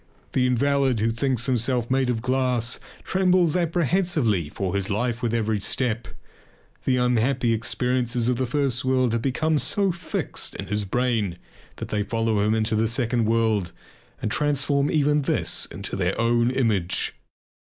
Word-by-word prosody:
The 125 -1 +2
invalid 135 -1 +2
who 115 +2 +1
thinks 125 0 -1
himself 125 -1 0
made 130 -1 +2
of 115 -2 -1
glass 125 -2 0 0.2
trembles 180 -3 +2
apprehensively 165 - +1
for 95 +3 -3
his 100 -1 -1
life 120 +3 -1
with 120 - 0
every 110 -2 0
step. 115 +3 -1 0.8
The 130 -1 +2
unhappy 125 0 +2
experiences 120 +1 0
of 125 -1 +1
the 130 0 -1
first 130 -2 0
world 130 -2 +1
have 115 - 0
become 150 +4 +1
so 190 +10 +2
fixed 175 +1 -4
in - - -5
his 105 +2 -1
brain 110 -4 0 0.4
that - - -7
they 105 - 0
follow 115 +1 0
him 105 +2 +2
into 110 0 0
the 110 +1 +2
second 115 0 0
world 110 -4 +1 0.5
and 110 - -3
transform 140 0 +1
even 150 -1 +2
this 140 - 0
into - - -5
their 95 -1 -1
own 120 +1 +2
image. 110 -9 0
120 Hz, 155 wpm, -24 LUFS, 110-135 Hz, 0.8 s, The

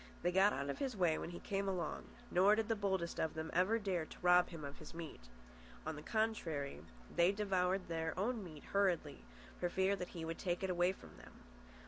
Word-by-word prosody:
They 175 - +3
got 190 +3 +5
out 140 -3 -1
of - - -7
his 265 -6 -2
way 170 -4 +3
when - - -4
he 175 - -7
came 195 0 -2
along; 175 -4 -2 0.3
nor 195 +4 +6
did 220 0 -1
the 225 - +3
boldest 190 -4 -1
of 160 - 0
them 160 0 -4
ever 185 +6 +3
dare 190 -6 -1
to - - -12
rob 180 0 +6
him 160 -4 -7
of 140 0 -8
his - - -10
meat. 155 - -8 0.6
On 160 0 -2
the 150 - -7
contrary, 175 -10 -1 0.3
they 175 +2 +5
devoured 190 -2 +1
their 160 0 -2
own 220 +3 0
meat 155 -5 -10
hurriedly, 175 -8 +1 0.4
for 175 - 0
fear 190 +2 +2
that 180 -2 -4
he 165 - -3
would 165 0 -4
take 175 -1 -1
it 190 - +1
away 175 +1 +3
from 190 - -13
them. - - -13
180 Hz, 215 wpm, -37 LUFS, 165-195 Hz, 0.6 s, nor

